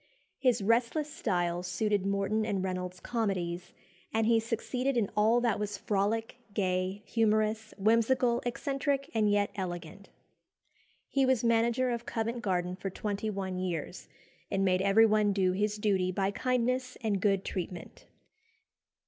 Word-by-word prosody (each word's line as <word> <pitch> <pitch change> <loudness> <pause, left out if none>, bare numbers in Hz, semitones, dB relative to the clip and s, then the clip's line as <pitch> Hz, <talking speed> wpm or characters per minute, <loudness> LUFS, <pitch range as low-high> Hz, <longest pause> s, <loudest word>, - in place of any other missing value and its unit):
His 250 -6 +2
restless 240 +7 +1
style 175 -1 -1
suited 195 +2 0
Morton 200 +2 0
and 200 -3 -1
Reynolds's 180 -1 -3
comedies, 180 -6 -2 0.4
and 225 0 +1
he 230 0 +4
succeeded 245 +3 -1
in 210 -4 +1
"all 220 +3 +4
that 235 -4 +1
was 210 0 -3
frolic, 220 +4 -1 0.2
gay, 185 0 -1
humorous, 220 0 +1
whimsical, 235 +4 +3
eccentric, 275 +3 -1
and 215 -2 +2
yet 205 0 +2
elegant." 175 0 -6 1.0
He 275 - +1
was 260 -3 +2
manager 235 +2 +2
of 235 0 -4
Covent 230 +1 -2
Garden 180 -4 -1
for 195 +1 -4
twenty 205 +2 -3
one 190 -3 -3
years, 180 -1 -4 0.4
and 195 -1 +1
made 185 -1 +2
everyone 210 +1 +4
do 190 -2 +2
his 210 +3 0
duty 195 -3 +1
by 195 +1 0
kindness 255 +2 -1
and 205 -4 0
good 195 -2 +2
treatment. 180 -1 -6
210 Hz, 140 wpm, -30 LUFS, 190-230 Hz, 1.0 s, he